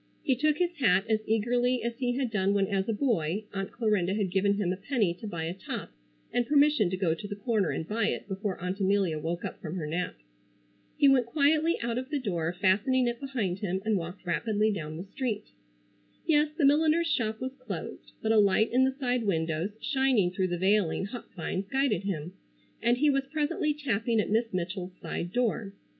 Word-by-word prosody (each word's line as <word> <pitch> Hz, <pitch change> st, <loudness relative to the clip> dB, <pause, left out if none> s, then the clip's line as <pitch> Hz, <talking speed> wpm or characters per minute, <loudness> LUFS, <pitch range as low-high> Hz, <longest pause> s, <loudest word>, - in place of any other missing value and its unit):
He 265 Hz, -, +2 dB
took 300 Hz, +3 st, +2 dB
his 350 Hz, 0 st, +1 dB
hat 200 Hz, -7 st, +3 dB
as 220 Hz, -1 st, +2 dB
eagerly 245 Hz, +2 st, +1 dB
as 235 Hz, 0 st, -2 dB
he 245 Hz, -2 st, 0 dB
had 260 Hz, -3 st, -1 dB
done 200 Hz, -1 st, +1 dB
when 200 Hz, -1 st, +3 dB
as 195 Hz, +1 st, -1 dB
a -, -, +3 dB
boy 210 Hz, -, 0 dB
Aunt 195 Hz, -1 st, -3 dB
Clarinda 205 Hz, -5 st, +1 dB
had 200 Hz, -4 st, -1 dB
given 200 Hz, +2 st, +2 dB
him 190 Hz, -3 st, 0 dB
a -, -, -3 dB
penny 205 Hz, -3 st, 0 dB
to 215 Hz, +5 st, -9 dB
buy 170 Hz, -5 st, -4 dB
a 165 Hz, +2 st, -2 dB
top 190 Hz, -, -6 dB, 0.4 s
and 245 Hz, -1 st, +1 dB
permission 290 Hz, -8 st, +4 dB
to 185 Hz, -, -2 dB
go 180 Hz, -4 st, +1 dB
to 205 Hz, +5 st, -6 dB
the 205 Hz, -, -5 dB
corner 205 Hz, -3 st, 0 dB
and 160 Hz, -, -3 dB
buy 215 Hz, 0 st, 0 dB
it -, -, -3 dB
before 195 Hz, -1 st, -3 dB
Aunt 180 Hz, +3 st, -3 dB
Amelia 190 Hz, -5 st, +2 dB
woke 170 Hz, +3 st, -3 dB
up -, -, -6 dB
from 160 Hz, +1 st, -5 dB
her 170 Hz, -5 st, -3 dB
nap. 165 Hz, -, -2 dB, 0.8 s
He 290 Hz, -, +5 dB
went 260 Hz, -3 st, +4 dB
quietly 310 Hz, +5 st, +3 dB
out 235 Hz, +1 st, -1 dB
of 260 Hz, +1 st, -7 dB
the 300 Hz, -, 0 dB
door, 175 Hz, -, -1 dB
fastening 205 Hz, +8 st, +2 dB
it 240 Hz, 0 st, -2 dB
behind 235 Hz, -10 st, -2 dB
him 190 Hz, -2 st, -1 dB
and 220 Hz, -1 st, +2 dB
walked 180 Hz, +1 st, -5 dB
rapidly 215 Hz, +4 st, +1 dB
down 155 Hz, -5 st, -4 dB
the 175 Hz, -, -5 dB
street. 215 Hz, 0 st, -4 dB, 0.7 s
Yes, 300 Hz, -2 st, +3 dB
the 295 Hz, -, +3 dB
milliner's 310 Hz, +4 st, +4 dB
shop 220 Hz, -9 st, -1 dB
was 260 Hz, +1 st, -4 dB
closed, 235 Hz, -, -7 dB
but 220 Hz, -, +2 dB
a 225 Hz, -, +5 dB
light 205 Hz, +2 st, +3 dB
in 255 Hz, +2 st, +4 dB
the 265 Hz, 0 st, 0 dB
side 250 Hz, -3 st, 0 dB
windows 165 Hz, -1 st, 0 dB
shining 260 Hz, -9 st, +2 dB
through 185 Hz, 0 st, 0 dB
the 175 Hz, -1 st, -2 dB
veiling 190 Hz, -1 st, +2 dB
hop 235 Hz, +4 st, -8 dB
vines 185 Hz, +2 st, -3 dB
guided 245 Hz, -6 st, +1 dB
him, 175 Hz, -3 st, -3 dB, 0.5 s
and 240 Hz, +1 st, +3 dB
he 295 Hz, +2 st, +4 dB
was 275 Hz, 0 st, 0 dB
presently 300 Hz, 0 st, 0 dB
tapping 235 Hz, -6 st, 0 dB
at 205 Hz, -, 0 dB
Miss 225 Hz, +1 st, +1 dB
Mitchell's 185 Hz, 0 st, -4 dB
side 175 Hz, -, -4 dB
door. 225 Hz, -4 st, 0 dB
210 Hz, 210 wpm, -29 LUFS, 185-255 Hz, 0.8 s, He